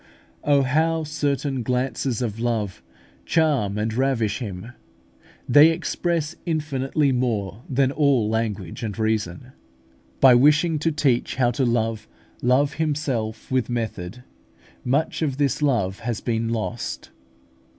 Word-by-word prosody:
Oh, 140 -1 +3
how 160 +4 +1
certain 140 -3 -1
glances 125 0 -1
of 110 -2 -4
love 110 -6 -2 0.4
charm 140 -12 +1
and 110 +1 -1
ravish 115 -4 0
Him! 105 -1 -6 0.8
They 145 +2 +7
express 165 -1 -1
infinitely 150 -3 0
more 115 -5 -1
than 135 0 +2
all 140 -7 +2
language 105 -5 -3
and 110 -3 -4
reason. 110 0 -2 0.7
By 130 -2 +8
wishing 150 +5 +4
to 165 +2 +1
teach 145 -6 +1
how 120 -2 +2
to 130 +2 0
love 115 -2 -1 0.3
Love 135 +4 +2
Himself 135 -9 -2
with 130 -3 +1
method, 115 -2 -4 0.6
much 140 +7 0
of 140 -4 -1
this 145 -1 0
love 115 -10 +1
has 115 -2 -3
been 115 -1 -1
lost. 115 +1 -4
125 Hz, 125 wpm, -23 LUFS, 110-145 Hz, 0.8 s, By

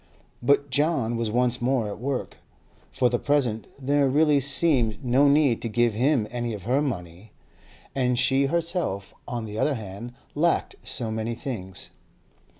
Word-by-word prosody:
But 140 +2 +2
John 135 -5 +1
was 115 -1 -1
once 125 +2 +1
more 125 -3 +1
at 105 - -6
work; 135 +1 -3 0.5
for 125 - +2
the 120 -1 0
present 130 -7 0
there 140 +1 +2
really 150 +1 +4
seemed 135 -5 +1
no 130 +4 +4
need 140 -4 +3
to 115 - -3
give 120 +1 +2
him 125 0 +2
any 120 -2 -3
of 100 - -9
her 130 +5 +1
money, 95 - -5 0.6
and 125 -2 +1
she 135 +3 +3
herself, 165 - -2
on 120 -2 -4
the 105 0 -6
other 150 - +2
hand, 110 +2 -7 0.2
lacked 165 +3 +1
so 120 -2 -2
many 110 +1 -2
things. 95 -8 -6
125 Hz, 155 wpm, -25 LUFS, 110-140 Hz, 0.6 s, really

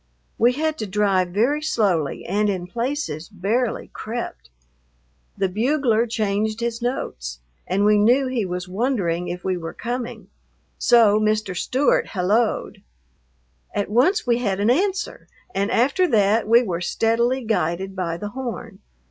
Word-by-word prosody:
We 240 +2 +4
had 310 +2 -1
to 215 - -3
drive 195 -2 +2
very 235 +12 +1
slowly 195 - 0
and 210 +1 +1
in 185 -3 -2
places 230 - -3
barely 215 +5 -1
crept. 215 - -6 0.9
The 195 - +1
bugler 235 +3 +1
changed 215 0 -1
his 235 0 -2
notes 60 - -4 0.3
and 195 +3 +1
we 210 0 +5
knew 245 +6 +4
he 255 -4 -1
was 180 -1 -4
wondering 185 -5 -1
if 175 0 -5
we 185 -1 -1
were 165 -1 -6
coming, 240 0 -5 0.5
so 225 -4 +5
Mr. 215 -3 0
Stewart 260 +10 +1
helloed. 210 +4 0 0.9
At 205 0 -1
once 300 - +3
we 240 -1 +2
had 200 -5 -1
an 210 +4 +3
answer, 390 +8 -1 0.3
and 200 +2 0
after 280 +12 +2
that 215 - +2
we 235 +2 +6
were 180 -6 -3
steadily 235 +7 +1
guided 190 -3 -1
by 170 -3 -2
the 205 +3 -5
horn. 235 -4 -6
215 Hz, 145 wpm, -22 LUFS, 190-245 Hz, 0.9 s, we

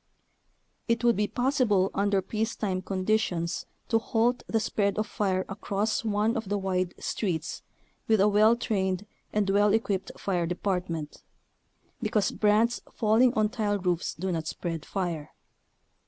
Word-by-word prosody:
It 230 0 +1
would 235 -1 +4
be 210 +1 +1
possible 245 -8 +2
under 200 -1 +1
peacetime 215 -4 -2
conditions 185 -3 -1 0.2
to 225 - +3
halt 235 +2 +1
the 225 - +1
spread 200 -2 0
of 215 - +1
fire 190 -3 -1
across 205 +2 -1
one 215 +1 +1
of 220 -4 -3
the 205 - +1
wide 185 -2 -1
streets 170 -7 -3 0.5
with 220 -2 +4
a 200 - +5
well 215 +2 +5
trained 195 -4 -1 0.3
and 210 -1 +1
well 205 +1 +4
equipped 200 -4 0
fire 175 -4 -1
department, 180 -4 -3 0.8
because 215 -3 +1
brands 220 +3 +2
fall 220 +1 +2
ing 255 -1 +6
on 215 -1 +2
tile 210 -3 0
roofs 180 -3 -1
do 185 +4 -2
not 160 -2 -2
spread 165 -2 -4
fire. 170 -6 -3
205 Hz, 145 wpm, -28 LUFS, 185-220 Hz, 0.8 s, ing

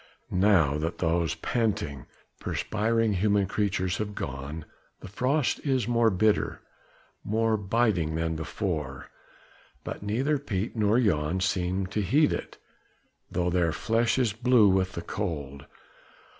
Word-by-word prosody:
Now 90 -7 +3
that 80 +3 -3
all 85 +1 +2
those 80 -5 -1
panting, 85 - -2 0.3
perspiring 110 +1 0
human 100 +1 +2
creatures 95 -1 -1
have 105 -1 -4
gone, 70 +2 -5 0.4
the - - -8
frost 130 +8 0
is 130 -6 0
more 115 -1 +3
bitter, 105 +2 +1 0.6
more 110 +1 +1
biting 100 -6 +1
than 80 0 -1
before; 75 -3 -4 0.7
but - - -6
neither 130 +9 0
Piet 110 -6 -3
nor 110 +1 +3
Jan 90 -6 +1
seem 95 0 0
to 105 +3 -2
heed 145 - +3
it, - - -6 0.7
though 90 0 0
their 85 -2 +2
flesh 115 +7 +1
is 120 -6 +1
blue 120 -2 +4
with 95 0 +1
the 85 - -5
cold. 75 -9 -5
100 Hz, 130 wpm, -27 LUFS, 85-110 Hz, 0.7 s, blue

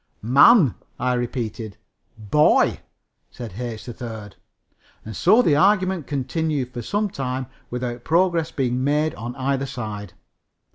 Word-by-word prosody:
"Man," 140 - +6 0.3
I 125 0 +1
repeated. 115 -4 -4 0.4
"Boy," 115 +8 +3 0.5
said 120 -3 -8
H. 120 -3 -5
3rd. 115 -4 -8 0.7
And 110 -1 -7
so 215 - +4
the 150 - +3
argument 185 0 +2
continued 145 -1 -2
for 120 - -5
some 205 - -1
time 130 -6 -4 0.2
without 120 -1 -4
progress 170 -1 +2
being 130 -4 -1
made 150 +3 +1
by 120 +2 -6
either 135 +1 -1
side. 105 -7 -6
130 Hz, 125 wpm, -22 LUFS, 120-155 Hz, 0.7 s, Man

